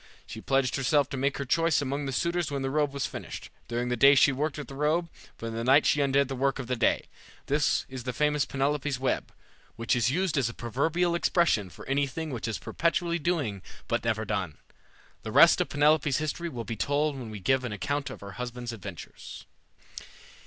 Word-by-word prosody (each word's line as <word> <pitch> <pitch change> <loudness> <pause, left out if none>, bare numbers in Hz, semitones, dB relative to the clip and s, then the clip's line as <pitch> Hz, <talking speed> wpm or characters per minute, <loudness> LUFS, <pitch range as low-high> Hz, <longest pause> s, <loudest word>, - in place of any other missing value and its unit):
She 110 - -8
pledged 135 -1 +1
herself 140 +1 +2
to - - -4
make 135 +1 0
her 140 - -3
choice 165 +2 +2
among 140 0 -2
the - - -2
suitors 170 +4 0
when 140 -2 -3
the 135 - -1
robe 150 -1 +1
was 140 -1 -2
finished. - - -7 0.2
During 120 +1 -2
the 125 - +1
day 140 +4 +7
she 140 - +6
worked 145 +3 -2
at 150 - -6
the - - -10
robe, 155 +4 0 0.3
but - - -7
in 115 - -4
the 115 +1 -3
night 135 +4 +5
she 145 - +3
undid 140 0 +2
the 135 - -4
work 135 +1 0
of 135 - -5
the 125 +1 -1
day. 115 - +1 0.4
This 145 +1 +1
is 130 -2 -7
the 125 - -2
famous 150 +2 +1
Penelope's 140 0 -1
web, 130 -1 -1 0.4
which 115 +1 0
is 120 0 +2
used 170 +1 +1
as 120 -4 +1
a 115 - -9
proverbial 160 +9 0
expression 170 - +2
for - - -12
anything 140 +3 -1
which 120 -3 -4
is 110 - -2
perpetually 170 0 -1
doing 145 - -1 0.3
but - - -1
never 110 -1 0
done. 95 -7 -3 0.6
The - - -6
rest - - +7
of - - -1
Penelope's 145 -1 +3
history 155 +2 -3
will 120 -6 -5
be 115 - -4
told 145 +5 0
when 125 -4 -7
we 105 -1 -7
give 130 +6 +1
an 125 - -4
account 140 +7 -2
of - - -9
her 100 -1 -8
husband's 120 -1 -5
adventures. 100 -5 -9
135 Hz, 215 wpm, -28 LUFS, 120-150 Hz, 0.6 s, day